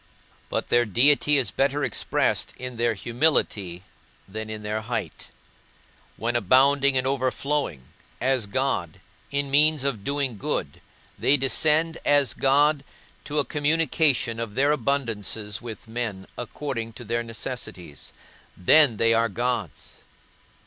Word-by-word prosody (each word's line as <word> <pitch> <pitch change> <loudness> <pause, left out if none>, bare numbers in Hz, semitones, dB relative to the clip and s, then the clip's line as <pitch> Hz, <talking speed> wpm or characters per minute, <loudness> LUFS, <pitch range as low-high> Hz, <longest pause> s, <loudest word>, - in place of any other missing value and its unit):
But - - -3
their 120 0 +4
deity 140 +6 +3
is 125 -8 +1
better 140 +1 0
expressed - - 0
in 125 -1 -7
their 120 -1 +1
humility 105 - 0 0.4
than 110 +2 -6
in 110 -1 -6
their 105 +1 -2
height; 115 +2 -5 0.9
when 120 +2 -2
abounding 135 +5 +4
and 130 - 0
overflowing, 135 - -1 0.4
as 130 -4 0
God, 100 - -2 0.3
in 140 -1 -2
means 150 0 +4
of 130 -8 -2
doing 140 -5 -2
good, - - -3 0.4
they 145 - +4
descend, 155 +4 +2
as 145 -2 +3
God, 145 +1 +3 0.4
to 150 - -4
a 145 - +2
communication 145 -5 +1
of 115 -3 -5
their 140 +2 +3
abundances 115 -7 -2
with 115 -3 -9
men 110 -5 -4
according 120 -2 -5
to 115 - -9
their 120 +2 -1
necessities, 115 - -6 0.5
then 125 - +5
they 115 +1 +3
are 115 0 +2
gods. 115 - -4
125 Hz, 130 wpm, -25 LUFS, 110-140 Hz, 0.9 s, then